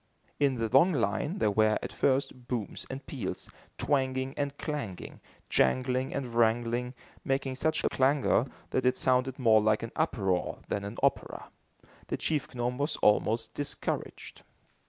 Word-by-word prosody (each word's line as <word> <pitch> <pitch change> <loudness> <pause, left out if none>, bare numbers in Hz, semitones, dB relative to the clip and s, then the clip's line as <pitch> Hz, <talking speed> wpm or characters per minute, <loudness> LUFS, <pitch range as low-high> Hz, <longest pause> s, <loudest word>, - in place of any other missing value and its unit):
In 140 -2 +3
the 115 -2 -1
long 140 - +5
line, 130 - 0
there 105 - +2
were, 110 +1 +3
at - - -5
first, 130 -2 0
booms 120 -5 -4
and 135 +1 -6
peals, 135 -6 -5 0.3
twanging 130 -2 0
and 145 -1 -3
clanging, 145 - -5 0.3
jangling 130 0 +1
and 130 -4 -4
wrangling, 120 +2 +1 0.3
making 135 0 -1
such 155 +5 0
a - - +2
clangor 135 -1 +2 0.2
that 130 - +1
it 130 - +2
sounded 130 0 +2
more 110 -4 +5
like 110 +1 +2
an 115 - -5
uproar 95 - 0
than 100 - -1
an 100 +3 -6
opera. - - 0 0.6
The - - -2
chief 150 -5 -2
gnome 125 +1 -2
was 145 +2 0
almost 110 +2 +2
discouraged. 145 0 -4
130 Hz, 150 wpm, -29 LUFS, 115-140 Hz, 0.6 s, long